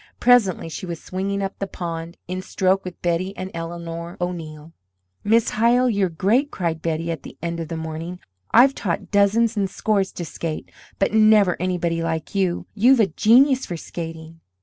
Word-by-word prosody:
Presently 240 -9 +4
she 165 +3 -6
was 170 -2 -5
swinging 195 +2 -3
up 195 - -5
the 195 - -2
pond 170 -2 -6
in 185 +1 -3
stroke 190 +1 +1
with 180 -2 -8
Betty 175 +3 -1
and 185 0 -5
Eleanor 170 +1 -6
O'Neill. 165 -3 -5 0.5
"Miss 225 +2 +3
Hyle, 240 +3 +3
you're 200 -3 +1
great!" 215 - +1
cried 165 - -3
Betty, 165 +1 -2
at 165 - -5
the - - -11
end 170 0 -3
of 165 - -4
the 165 0 -5
morning. 160 +2 -5 0.3
"I've 260 +4 +6
taught 180 -4 -3
dozens 210 +3 +3
and 200 -2 0
scores 200 -1 0
to 175 - -5
skate, 160 0 -5 0.3
but 195 - +1
never 215 -4 +5
anybody 175 -2 -1
like 165 -1 -3
you. 190 -3 0
You've 245 +5 +5
a 220 - +6
genius 255 - +4
for 175 - -4
skating." 165 0 -8
180 Hz, 175 wpm, -22 LUFS, 165-205 Hz, 0.5 s, I've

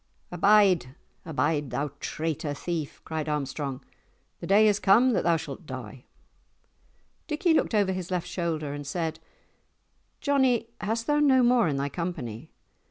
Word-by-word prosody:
"Abide, 180 -7 +4 0.3
abide, 150 -2 0
thou 140 +4 -2
traitor 155 -2 -3
thief!" 160 -1 -5
cried 160 -1 -3
Armstrong; 140 -2 -3 0.6
"the - - -7
day 210 +3 +5
is 210 -1 +2
come 230 +7 +5
that 210 - +1
thou 170 -1 +3
shalt - - -8
die!" - - -8 1.2
Dickie 320 +2 +1
looked 275 - +1
over 200 -2 +3
his 185 -2 -4
left 180 -2 -2
shoulder 165 -5 -3
and 145 -1 -7
said, 160 +1 -3 1.0
"Johnie, 260 -5 +2
hast 225 +2 -2
thou 295 0 +2
no 265 -4 +5
more 240 -4 +4
in 145 -3 -1
thy 140 +1 -1
company? 150 - -5
175 Hz, 145 wpm, -27 LUFS, 150-215 Hz, 1.2 s, day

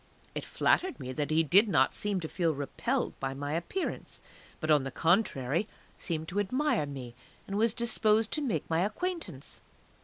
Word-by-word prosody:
It - - -4
flattered 370 -8 +1
me 130 - -5
that 145 0 -2
he 160 +1 +3
did 195 +8 +5
not 135 -7 +3
seem 205 -2 -1
to 160 - -3
feel 165 -2 0
repelled 235 - -1
by 135 0 -3
my 145 +2 -3
appearance, 175 - -3 0.4
but 155 -1 0
on 150 -3 +5
the 135 - -3
contrary 165 - +1 0.3
seemed 160 -3 -4
to 190 +3 -1
admire 255 - +1
me, 130 -4 -7 0.3
and 195 - -5
was 225 +2 +2
disposed 225 -2 +2
to 305 - +1
make 215 - -1
my 165 0 +1
acquaintance. 340 - -3
175 Hz, 175 wpm, -30 LUFS, 145-225 Hz, 0.4 s, did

